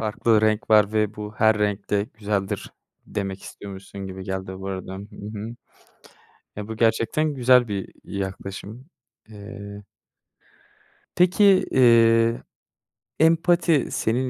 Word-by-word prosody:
farklı 110 0 +2
renk 110 +2 0
var 105 -1 +5
ve 105 -1 0
bu 105 0 -7
her 110 0 +3
renk 105 -1 -2
de 100 -1 +1
güzeldir 100 -2 -3 0.3
demek 100 -2 -4
istiyormuşsun 100 0 -9
gibi 95 0 -8
geldi, 95 -1 -5
bu 95 - -7
arada. 95 -1 -5
Hı 95 - -7 0.4
hı. 110 +3 -6 1.0
Ya, 105 0 -6
bu 110 - -5
gerçekten 115 +7 +1
güzel 125 -2 +4
bir 100 -3 -4
yaklaşım. 100 +5 -6 0.4
Eee 100 -1 -10 1.3
Peki, 180 +3 +4 0.3
eee, 115 -2 +4 0.8
empati 165 -1 +3
senin 125 +4 0
105 Hz, 120 wpm, -23 LUFS, 100-115 Hz, 1.3 s, var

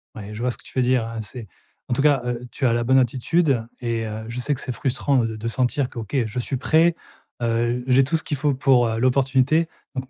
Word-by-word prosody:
Ouais, 105 -2 -8
je 105 - -6
vois 125 - +1
ce - - -8
que - - -19
tu - - -11
veux - - +4
dire 125 -2 +2
hein, 115 0 -6
c'est 110 +2 -8 0.4
en - - -1
tout 125 - +1
cas, 145 -3 +4
heu, 120 -1 -2
tu 140 - -2
as 120 - +3
la 120 0 0
bonne 130 +3 +4
attitude 130 +1 +2 0.2
et 115 -2 -2
heu, 110 +1 -5
je 115 +2 -5
sais 145 +3 0
que 135 - -6
c'est 130 - -4
frustrant 135 +2 0
de 110 -1 -4
de 110 +2 -5
sentir 125 +2 0
que: - - -8
«OK 110 +3 -6
je 110 +3 -4
suis 130 +2 -2
prêt, 165 +6 +3 0.5
heu, 120 +1 0
j'ai 130 +1 +5
tout 140 +5 0
ce 160 - 0
qu'il 155 -6 -3
faut 145 +1 +1
pour, 130 -2 +4
heu, 115 0 -2
l'opportunité, 135 +5 +2 0.3
donc 130 -2 -5
125 Hz, 260 wpm, -23 LUFS, 115-135 Hz, 0.5 s, j'ai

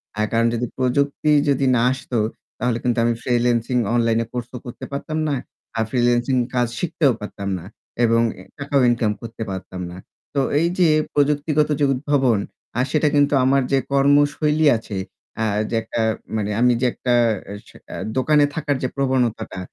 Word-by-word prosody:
অ্যা 105 - 0
কারণ 115 0 +3
যদি 120 +1 -1
প্রযুক্তি 140 +4 +1 0.2
যদি 140 -1 +2
না 115 - +2
আসত 130 0 -7 0.5
তাহলে 120 0 0
কিন্তু 125 -1 0
আমি 120 - +2
ফ্রিল্যান্সিং 120 0 +1 0.2
অনলাইনে 115 -1 +2
কোর্সও 125 0 -5
করতে 120 - -8
পারতাম 150 +3 -4
না। - - 0 0.4
আর 110 - +2
ফ্রিল্যান্সিং 120 +1 +2 0.2
কাজ 120 -1 +2
শিখতেও 160 -5 +2
পারতাম 100 -1 -5
না। 85 - -11 0.4
এবং 115 0 +4 0.4
টাকাও 140 -1 +1
ইনকাম 115 -3 +1
করতে 115 -1 -6
পারতাম 95 -1 -6
না। 90 - -9 0.4
তো 140 - 0 0.2
এইযে 175 +1 +2 0.3
প্রযুক্তিগত 150 +1 +2
যে 145 - +3
উদ্ভাবন, 130 -4 +1 0.4
আর 125 - +2
সেটা 155 -1 +2
কিন্তু 145 0 +3
আমার 135 +1 +3
যে 135 - +4
কর্মশৈলী 145 +2 +3
আছে 105 -3 -7 0.4
অ্যা 115 - -1 0.3
যে - - -2
একটা 115 +1 -3 0.4
মানে 105 -1 -2
আমি 125 0 +5
যে - - +2
একটা 125 - -1 0.5
স - - -16 0.2
অ্যা - - -7 0.2
দোকানে 150 +3 +4
থাকার 150 -3 -1
যে - - +2
প্রবণতাটা 125 -7 -1
125 Hz, 160 wpm, -21 LUFS, 115-145 Hz, 0.5 s, আমি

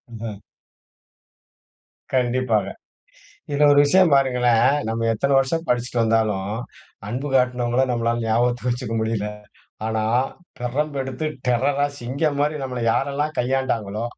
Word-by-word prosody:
ம்ஹ. 110 -2 -6 1.8
கண்டிப்பாக. 125 -5 +1 0.9
இதுல 145 +1 +4
ஒரு 145 - +6
விஷயம் 180 +3 +4
பாருங்களேன், 125 -3 +3 0.2
நம்ம 115 +1 -1
எத்தன 140 +6 0
வருஷம் 165 +5 -1
படிச்சிட்டு 120 0 0
வந்தாலும், 110 -3 +1 0.6
அன்பு 125 +7 -3
காட்டுனவங்கள 125 -1 +2
நம்மளால 120 0 0
ஞாபகத்துக்கு 120 +2 +1
வச்சுக்க 125 -1 -4
முடியல. 110 -2 -1 0.6
ஆனா, 110 -1 -1 0.6
பிரம்பு 140 +4 -2
எடுத்து 130 +3 -4 0.2
டெரர்ரா 135 +4 +2
சிங்கம் 140 +5 -1
மாரி 150 +1 +1
நம்மள 125 -2 -4
யாரெல்லாம் 145 +5 -1
கையாண்டாங்களோ, 120 -5 -1
125 Hz, 110 wpm, -22 LUFS, 115-140 Hz, 1.8 s, ஒரு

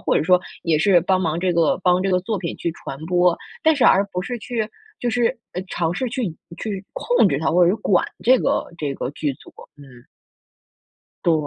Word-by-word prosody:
或 - - +1
者 - - +1
说， 180 +1 +4 0.2
也 160 -2 +2
是 175 +2 +4
帮 185 +2 +1
忙 165 -2 -1
这 180 0 +1
个 165 -2 +2
帮 180 0 +3
这 195 - 0
个 180 - +3
作 205 +3 -3
品 170 -3 -4
去 170 - -3
传 135 - -8
播。 180 -1 +3 0.3
但 320 -1 +4
是 270 - +2
而 195 - +5
不 180 - -2
是 245 +4 -4
去 220 -1 -3 0.3
就 245 - -2
是， 240 +1 +1 0.3
呃， 180 - -4
尝 170 -3 -1
试 255 +4 -2
去 250 0 -2
引 165 -5 -5 0.2
去 200 -3 -4
控 485 - +3
制 140 - 0
它， 160 - 0
或 175 +2 +4
者 175 - +4
是 205 - 0
管 200 -4 +2 0.2
这 255 +2 +6
个 - - 0
这 145 -4 -2
个 130 - -4
剧 145 -1 -2
组， - - -16 0.3
嗯。 135 -4 -15 1.2
对， 170 - +4
180 Hz, 240 characters per minute, -21 LUFS, 165-210 Hz, 1.2 s, 这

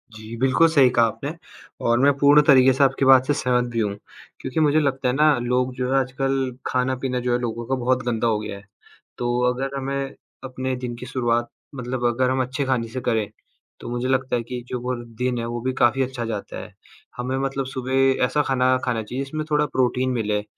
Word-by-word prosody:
जी, 110 +2 -9
बिल्कुल 135 +6 +4
सही 140 -5 +5
कहा 120 -2 +3
आपने 140 +6 -4 0.5
और 120 +1 +3
मैं 140 +1 +5
पूर्ण 145 +2 +6
तरीके 130 -2 +6
से 135 +2 +2
आपकी 135 0 +2
बात 130 -1 +6
से 145 - +3
सहमत 125 -3 +1
भी 115 - -2
हूँ। 105 -2 -1 0.4
क्योंकि 130 +4 -3
मुझे 155 0 +4
लगता 135 -3 0
है 125 - +1
ना 150 0 +4
लोग 125 +1 0
जो 125 0 -2
है 135 - +4
आजकल 130 0 -1
खाना-पीना 130 0 -1
जो 125 - +1
है - - +3
लोगों 120 -1 -4
का 130 - -1
बहुत 125 0 +1
गंदा 120 -1 0
हो 110 -2 +1
गया 105 -2 -6
है, 100 - -14 0.5
तो 120 0 -1
अगर 135 +2 -4
हमें 135 0 -3 0.3
अपने 130 0 -3
दिन 125 -1 -5
की 120 - -9
शुरुआत 120 -2 -1 0.3
मतलब 125 -1 -3
अगर 125 +2 +1
हम 130 0 +1
अच्छे 130 +2 -3
खाने 125 -3 0
से 125 +3 -6
करें, 110 -4 0 0.5
तो - - -8
मुझे 120 +1 -2
लगता 130 -1 0
है 120 - -1
कि 125 +1 -6
जो 125 - -4
वो 125 +1 -2 0.2
दिन 125 0 -1
है 115 - -3
वो 120 0 -4
भी 130 +2 -1
काफ़ी 130 +1 +2
अच्छा 125 -2 -4
जाता 110 -3 -5
है। - - -10 0.4
हमें 125 +2 -2
मतलब 135 0 -2
सुबह 130 +1 +1
ऐसा 150 +4 +1
खाना, 130 -1 +2
खाना 120 -3 -1
चाहिए 125 +5 -4
जिसमें 155 +3 -5
थोड़ा 150 0 +3
प्रोटीन 130 -1 0
मिले 105 -4 -1
130 Hz, 220 wpm, -23 LUFS, 120-135 Hz, 0.5 s, पूर्ण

